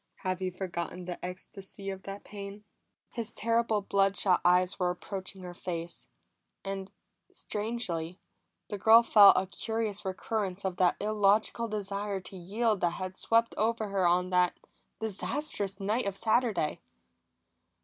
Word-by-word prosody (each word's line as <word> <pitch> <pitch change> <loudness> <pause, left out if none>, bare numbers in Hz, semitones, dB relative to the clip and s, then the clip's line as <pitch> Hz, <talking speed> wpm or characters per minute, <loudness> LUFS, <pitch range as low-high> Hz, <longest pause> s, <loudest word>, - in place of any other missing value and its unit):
Have 185 0 -1
you 185 - 0
forgotten 180 -1 -5
the 175 -1 -6
ecstasy 195 +2 -7
of 190 0 -7
that 195 +1 -7
pain?" 200 0 -8 0.5
His 230 -3 -4
terrible, 230 -2 +1
blood 195 0 +2
shot 185 -3 +3
eyes 180 +2 +3
were 180 -1 +2
approaching 190 +1 -5
her 180 -1 -7
face; 170 -1 -5 0.6
and 195 0 -4 0.4
strangely, 195 -6 -3 0.5
the 205 - -4
girl 225 +3 +8
felt 205 -3 +8
a 185 - +2
curious 220 +1 -3
recurrence 195 0 -3
of 185 -2 -2
that 180 -1 +4
illogical 215 +2 +2
desire 205 -1 -3
to 190 - -11
yield 210 +4 0
that 170 -1 +2
had 185 0 -5
swept 230 +3 +2
over 220 0 +1
her 195 -2 +2
on 180 +1 +2
that 180 -1 +2 0.4
disastrous 215 -1 -3
night 210 +3 0
of 195 -1 -3
Saturday. 220 -8 +1
195 Hz, 140 wpm, -30 LUFS, 185-215 Hz, 0.6 s, girl